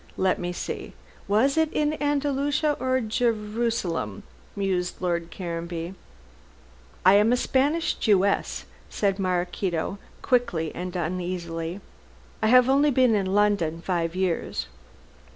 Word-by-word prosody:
Let 190 0 +2
me 175 0 -3
see, 175 - -5 0.3
was 230 +9 +3
it 320 -1 +2
in 300 0 +1
Andalusia 290 +1 +1
or 260 0 +1
Jerusalem?" 215 - -1 0.3
mused 185 -3 -1
Lord 170 -2 -1
Caranby. 170 0 -5 1.1
"I 185 - +8
am 210 +3 +5
a 250 - +3
Spanish 290 +7 +1
Jewess," 200 -2 +1 0.2
said 200 -1 0
Maraquito, 180 0 -1 0.2
quickly 220 - +1
and 180 +1 -5
uneasily, 175 0 -3 0.6
"I 220 - +2
have 250 +2 +6
only 280 +3 +4
been 255 -3 +4
in 200 -3 +1
London 195 -5 +2
five 170 0 -1
years." 175 - -1
195 Hz, 115 wpm, -25 LUFS, 175-250 Hz, 1.1 s, I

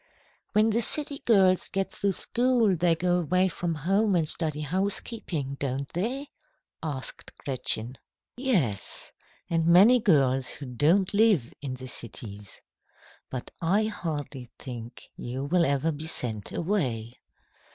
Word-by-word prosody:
"When 215 +1 +4
the 230 +2 +2
city 285 +4 +3
girls 190 -5 +4
get 195 0 -2
through 200 -1 -1
school, 240 -2 +2
they 170 0 +2
go 180 +1 +1
away 185 +3 +2
from 175 -1 -3
home 195 +6 +1
and 165 -3 +1
study 155 -2 -2
housekeeping 175 - -3
don't 135 0 -2
they?" 250 - -3 0.5
asked 145 -5 -5
Gretchen. 125 -2 -1 0.4
"Yes, 190 - -1 0.4
and 165 -1 0
many 200 +9 +7
girls 135 - +3
who 140 - -5
don't 160 - +2
live 200 - +3
in 130 -3 -5
cities. 105 -4 -6 0.7
But 130 -2 -6
I 190 +6 +2
hardly 150 - -4
think 120 -2 -8
you 125 +3 -5
will 170 +3 +2
ever 140 +3 +1
be 155 +1 -5
sent 110 -9 +1
away. 130 - -2
165 Hz, 130 wpm, -27 LUFS, 135-195 Hz, 0.7 s, many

